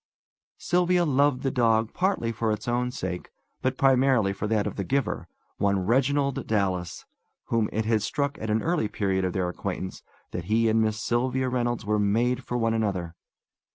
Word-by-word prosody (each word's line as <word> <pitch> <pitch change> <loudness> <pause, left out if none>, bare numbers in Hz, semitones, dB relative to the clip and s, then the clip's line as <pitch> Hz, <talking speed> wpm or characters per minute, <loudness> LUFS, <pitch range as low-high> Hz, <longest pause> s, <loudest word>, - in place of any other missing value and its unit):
Sylvia 180 0 +2
loved 140 -2 +2
the 135 - +1
dog 115 -3 +2
partly 185 -11 0
for 115 -1 -1
its 105 - -4
own 125 +1 0
sake, 95 -8 -5 0.3
but 130 0 0
principally 130 -6 +3
for 100 +2 -3
that 105 -1 +1
of - - -3
the 100 - -2
giver, 135 +7 -1 0.3
one 100 -2 +1
Reginald 140 +4 +1
Dallas, 95 -5 -1 0.4
whom 115 -2 +1
it 110 +1 -1
had 110 -1 +2
struck 140 +6 -2
at 110 - -4
an 110 +1 +1
early 170 -9 +1
period 95 -2 -1
of 90 -1 -1
their 90 -2 0
acquaintance 95 +1 -5 0.3
that 90 - -4
he 115 +4 +2
and 110 0 +3
Miss 110 0 0
Sylvia 130 +3 0
Reynolds 120 -3 -1
were 105 0 +1
made 120 +5 +1
for 125 - -3
one 115 -1 +1
another. 95 -7 -1
115 Hz, 180 wpm, -26 LUFS, 105-130 Hz, 0.4 s, principally